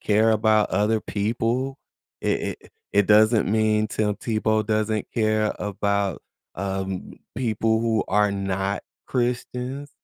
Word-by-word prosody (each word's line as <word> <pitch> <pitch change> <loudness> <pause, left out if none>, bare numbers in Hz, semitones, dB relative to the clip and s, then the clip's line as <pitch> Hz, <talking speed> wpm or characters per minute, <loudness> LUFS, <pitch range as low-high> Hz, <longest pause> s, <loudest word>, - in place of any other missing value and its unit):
care 110 +2 +3
about 110 -1 +3
other 105 +3 +2
people. 115 +7 -1 0.4
It - - 0 0.2
it - - -19 0.2
it 100 -1 +3
doesn't 110 0 +5
mean 110 0 +2
Tim 105 -1 0
Tebow 110 -1 0
doesn't 110 -1 0
care 110 -1 +1
about, 100 -2 -1 0.3
um, 95 0 -4 0.2
people 110 -2 +1
who 115 -2 +1
are 105 +1 +3
not 95 0 -2 0.2
Christians. 125 +2 -2
110 Hz, 120 wpm, -24 LUFS, 100-115 Hz, 0.4 s, doesn't